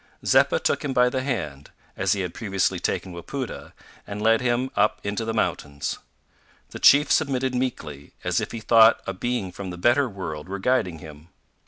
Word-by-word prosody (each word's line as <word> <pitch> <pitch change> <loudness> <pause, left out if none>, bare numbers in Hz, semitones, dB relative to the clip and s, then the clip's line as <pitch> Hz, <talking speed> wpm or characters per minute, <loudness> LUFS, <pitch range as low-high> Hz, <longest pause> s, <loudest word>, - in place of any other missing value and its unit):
Zeppa - - +4
took - - 0
him 140 -2 -2
by 125 0 +4
the 130 +1 -2
hand, 85 - -4 0.3
as - - +1
he 100 - -2
had 90 -2 -4
previously 95 -4 -1
taken 95 0 -2
Wapoota, 125 +9 -6 0.4
and 100 0 -6
led 115 +2 +3
him 125 +1 0
up 105 +1 +2
into 105 +3 -3
the 115 - -2
mountains. 70 -10 -2 0.7
The - - -8
chief 145 +2 +6
submitted 130 -4 +1
meekly, 80 - -4
as - - 0
if - - -5
he 115 - -6
thought 115 0 +6
a 95 - -3
being 100 -1 -3
from 95 +1 -7
the 90 - -7
better 120 +8 +3
world 90 -5 -7
were 100 - -3
guiding 100 -5 0
him. 75 0 -12
105 Hz, 185 wpm, -24 LUFS, 90-125 Hz, 0.7 s, chief